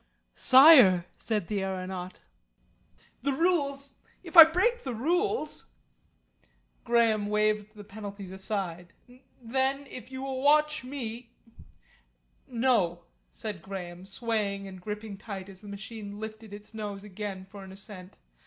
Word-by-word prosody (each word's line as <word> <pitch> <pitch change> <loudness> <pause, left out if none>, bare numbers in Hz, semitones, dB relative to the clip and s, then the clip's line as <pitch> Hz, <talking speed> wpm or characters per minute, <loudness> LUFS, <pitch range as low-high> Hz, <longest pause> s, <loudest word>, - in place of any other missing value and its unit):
"Sire," 255 - +8
said 210 -6 -1
the 205 -2 -1
aeronaut, 185 -1 -5 1.0
"the 280 - 0
rules 280 -4 0 0.2
if 345 -1 -11
I 330 - +14
break 375 +10 +1
the 255 -3 -4
rules 350 - -1 0.5
" - - -38
Graham 225 -3 +3
waved 210 0 0
the 205 - -10
penalties 200 -2 -8
aside. 190 -3 -4 0.5
"Then 265 +3 -1
if 250 -2 -10
you 260 0 -6
will 265 -1 -3
watch 300 +1 +3
me 245 -3 -6 0.6
" - - -30 0.5
"No," 230 -9 +1 0.3
said 210 -6 -6
Graham, 180 -1 -8
swaying 200 -2 -2
and 190 -1 -10
gripping 210 0 -6
tight 195 -3 -7
as 190 0 -12
the 210 - -12
machine 205 0 -8
lifted 220 0 -8
its 205 +2 -11
nose 205 -2 -6
again 200 -1 -6
for 195 +1 -11
an 190 - -11
ascent. 190 -1 -11
210 Hz, 135 wpm, -28 LUFS, 195-260 Hz, 1.0 s, I